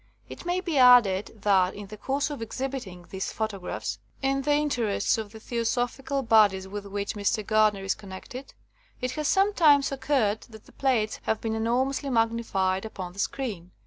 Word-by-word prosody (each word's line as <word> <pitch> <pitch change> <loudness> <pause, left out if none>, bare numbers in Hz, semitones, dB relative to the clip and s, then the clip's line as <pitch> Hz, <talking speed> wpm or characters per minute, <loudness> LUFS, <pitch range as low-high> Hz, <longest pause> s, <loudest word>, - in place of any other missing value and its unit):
It - - -9
may 360 +1 0
be 335 -7 0
added 225 -5 +5
that 190 -3 +3
in 205 - -7
the 205 +2 -9
course 275 +7 -2
of 285 - -6
ex 225 - -6
hibiting 240 -10 -5
these 190 0 -4
photographs 210 -4 -4 0.2
(in 275 0 +1
the 290 +2 +1
interests 245 -9 +1
of 215 -2 -6
the 220 - -11
Theosophical 245 +4 -2
bodies 205 -5 +4
with 200 +1 -6
which 200 0 -3
Mr. 210 +1 -1
Gardner 215 -2 +3
is 195 - +1
connected), 210 +7 -10 0.4
it 250 0 -2
has 300 +3 -2
sometimes 335 -9 +4
oc 270 -1 -7
curred 220 -7 +2
that 220 -2 -14
the - - -18
plates 240 -6 0
have 220 - 0
been 225 -1 -2
enormously 255 +5 0
magnified 225 -6 0
upon 185 -5 -7
the 195 - -12
screen. 200 -8 -3
225 Hz, 175 wpm, -27 LUFS, 200-270 Hz, 0.4 s, added